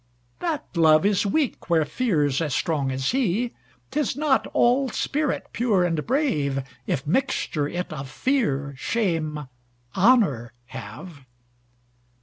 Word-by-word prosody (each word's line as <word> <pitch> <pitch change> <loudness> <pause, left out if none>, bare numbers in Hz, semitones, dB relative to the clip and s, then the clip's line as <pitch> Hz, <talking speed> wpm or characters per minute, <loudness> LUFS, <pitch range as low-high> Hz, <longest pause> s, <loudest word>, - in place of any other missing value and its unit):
That 325 -4 -2
Love 155 0 +5
is 205 0 +2
weak 275 -3 -1
where 160 -2 +3
Fear's 150 - 0
as 150 -5 -1
strong 145 -5 0
as 130 +1 -1
he;'Tis 245 - -2
not 295 -2 +2
all 255 +3 +2
spirit 295 +2 -1
pure 220 -6 +2
and 165 -3 -1
brave, 150 - 0 0.2
If 135 - -1
mixture 170 - 0
it 175 +1 -4
of 135 -3 -6
Fear, 145 - 0
Shame, 160 - -1 0.5
Honour 185 - +3 0.2
have. 130 - -9
175 Hz, 120 wpm, -24 LUFS, -, 0.5 s, Love